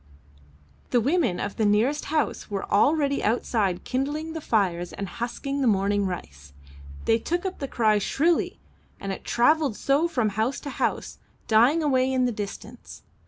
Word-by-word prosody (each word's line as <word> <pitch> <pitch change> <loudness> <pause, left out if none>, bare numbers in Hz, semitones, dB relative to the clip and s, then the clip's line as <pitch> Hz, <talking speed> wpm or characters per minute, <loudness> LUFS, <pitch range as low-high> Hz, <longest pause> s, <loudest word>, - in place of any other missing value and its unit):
The 245 - +3
women 270 - +1
of 205 - -4
the 220 - +1
nearest 220 +8 +2
house 310 0 -1
were 200 -2 -3
already 280 +5 +3
outside 210 -4 0
kindling 295 +5 -2
the 320 - -5
fires 180 -8 0
and 200 - -5
husking 260 +7 -4
the 260 - +2
morning 200 -1 +2
rice. 70 - -8 0.5
They 225 0 +3
took 345 - -2
up 380 - -4
the 275 - -3
cry 215 -4 +2
shrilly, 320 - 0 0.4
and 195 - -4
it 190 - -6
travelled 280 0 +2
so 285 +5 +2
from 245 -10 0
house 220 +6 -1
to 285 - -6
house, - - -2 0.3
dying 245 +9 +4
away 260 -3 +2
in 255 -1 +2
the 245 - +1
distance. 215 +3 -8
240 Hz, 165 wpm, -25 LUFS, 205-285 Hz, 0.5 s, dying